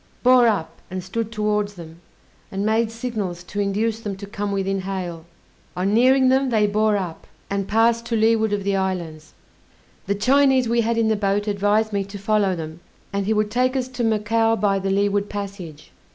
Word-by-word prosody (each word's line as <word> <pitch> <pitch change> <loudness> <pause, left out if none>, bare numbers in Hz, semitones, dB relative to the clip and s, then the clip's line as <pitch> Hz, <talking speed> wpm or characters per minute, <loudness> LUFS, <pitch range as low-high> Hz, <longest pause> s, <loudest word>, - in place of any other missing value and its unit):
Bore 250 -1 +6
up, 205 -8 -2
and 185 0 -5
stood 225 +4 -4
towards 210 -2 -1
them, 165 -1 -11 0.5
and 195 +1 -2
made 220 +1 +2
signals 215 -7 -4
to 205 +3 -6
induce 210 +3 0
them 205 -3 -5
to 200 - -7
come 205 0 -4
within 195 0 -1
hail; 180 -4 -5 0.5
on 190 +3 0
nearing 260 +3 +5
them, 265 +1 +2
they 215 -3 +3
bore 210 0 +2
up, 180 -4 -6 0.2
and 200 -1 -1
passed 230 +2 +2
to 235 - -1
leeward 220 -1 +2
of 205 -1 -1
the 200 0 0
islands. 170 -5 -3 0.7
The 200 - +1
Chinese 260 +3 +3
we 235 +1 +2
had 230 +1 0
in 225 -1 +2
the 220 - +2
boat 205 0 0
advised 205 +2 +1
me 200 -1 0
to 200 +1 -8
follow 200 -1 +1
them, 160 0 -7 0.3
and 200 0 -1
he 220 - +2
would 210 -1 0
take 255 +3 +1
us 255 -1 -1
to 250 -1 -4
Macao 225 +1 +2
by 200 -3 +1
the 195 0 -2
leeward 200 +1 +1
passage. 195 - -7
205 Hz, 195 wpm, -22 LUFS, 195-225 Hz, 0.7 s, Bore